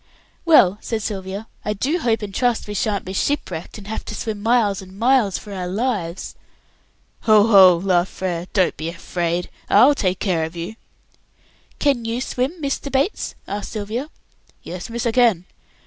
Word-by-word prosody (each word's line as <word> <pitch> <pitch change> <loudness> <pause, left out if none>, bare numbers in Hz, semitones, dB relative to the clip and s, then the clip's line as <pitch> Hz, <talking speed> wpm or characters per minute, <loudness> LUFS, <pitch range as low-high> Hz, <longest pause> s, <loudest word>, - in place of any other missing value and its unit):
"Well," 210 - +5
said 225 -2 -3
Sylvia, 195 0 -4 0.2
"I 210 - -1
do 280 - -1
hope 230 -6 0
and 200 -1 -6
trust 245 +1 0
we 205 - -5
sha'n't 205 -1 -1
be 190 - -5
shipwrecked, 190 - -2
and 205 - -11
have 220 +2 -4
to - - -6
swim 215 -2 -4
miles 220 -3 +2
and 190 0 -13
miles 235 -4 +3
for 205 - -9
our 185 -2 -4
lives." 195 -4 -2 0.9
"Ho, 215 -2 +6
ho!" 190 -5 +7
laughed 180 0 +1
Frere; 180 -2 -3
"don't 190 -3 +2
be 160 +3 -3
afraid. 170 0 -2 0.2
I'll 250 +8 +7
take 185 -9 0
care 180 -5 0
of 160 +2 -5
you." 170 +5 -5 1.0
"Can 275 -5 +1
you 230 +1 -2
swim, 255 +2 -1
Mr. 280 -1 -3
Bates?" 275 +10 0
asked 205 0 -5
Sylvia. 225 +7 -4 0.5
"Yes, 180 +4 -7
miss, 235 +1 -3
I 235 - +2
can." 225 -7 +3
205 Hz, 170 wpm, -21 LUFS, 185-235 Hz, 1.0 s, ho